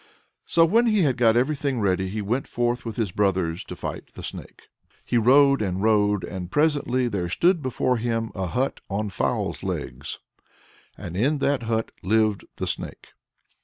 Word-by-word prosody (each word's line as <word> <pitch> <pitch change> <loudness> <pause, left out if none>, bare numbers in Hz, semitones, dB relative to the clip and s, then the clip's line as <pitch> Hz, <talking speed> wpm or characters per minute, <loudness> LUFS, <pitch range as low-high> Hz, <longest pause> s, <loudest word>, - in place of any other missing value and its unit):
So 165 -1 +5
when 230 +8 +3
he 215 -4 +3
had 135 -5 +2
got 115 -2 +4
everything 140 0 0
ready, 95 -2 +1
he 105 +2 -3
went 120 +7 -1
forth 120 0 -1
with 115 -2 -4
his 110 -6 -1
brothers 95 -4 0
to - - -7
fight - - -7
the - - -9
Snake. - - -8 0.4
He - - -2
rode 140 +3 +5
and 95 -1 -2
rode, 105 -2 +3
and 90 -2 -6
presently 145 -3 +1
there 95 -6 -2
stood 175 - +2
before 130 -1 0
him 115 -1 -2
a 95 -2 -3
hut 130 +9 -1
on 105 +1 -2
fowl's - - -1
legs, - - -5 0.8
and 85 - -7
in 135 +10 +2
that 140 -1 +1
hut 115 -1 -1
lived 110 +1 +1
the - - -3
Snake. - - -5
115 Hz, 170 wpm, -24 LUFS, 100-135 Hz, 0.8 s, So